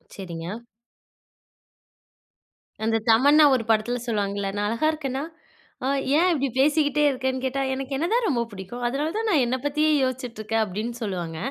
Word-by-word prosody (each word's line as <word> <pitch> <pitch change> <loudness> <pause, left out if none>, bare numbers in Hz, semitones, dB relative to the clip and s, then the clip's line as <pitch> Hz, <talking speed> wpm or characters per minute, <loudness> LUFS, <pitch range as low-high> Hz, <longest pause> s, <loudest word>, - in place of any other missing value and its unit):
சரிங்க. 175 +2 -6 2.2
அந்த 225 0 +2
தமன்னா 285 +7 +6
ஒரு 240 - -1
படத்துல 225 +3 +1
சொல்லுவாங்கல்ல, 200 -3 -1
"நான் 205 0 0
அழகா 230 +8 0
இருக்கேனா?" 275 -3 -4 0.6
அ - - +1 0.3
"ஏன் 360 +3 +4
இப்டி 275 -3 0
பேசிட்டே 295 +1 +3
இருக்கன்னு?" 260 0 -2
கேட்டா, 275 +1 -1
"எனக்கு 270 +1 -4
என்ன 325 +5 0
தான் 475 -2 +2
ரொம்ப 245 -6 +1
புடிக்கும். 200 +5 -8
அதனால 290 +6 -2
தான் 450 0 -1
நான் 290 -7 +4
என்ன 255 +2 0
பத்தியே 300 +2 +2
யோசிச்சுட்டுருக்க" 240 -4 -3
அப்டின்னு 215 +5 -5
சொல்லுவாங்க. 175 -5 -4
255 Hz, 145 wpm, -24 LUFS, 215-290 Hz, 2.2 s, தமன்னா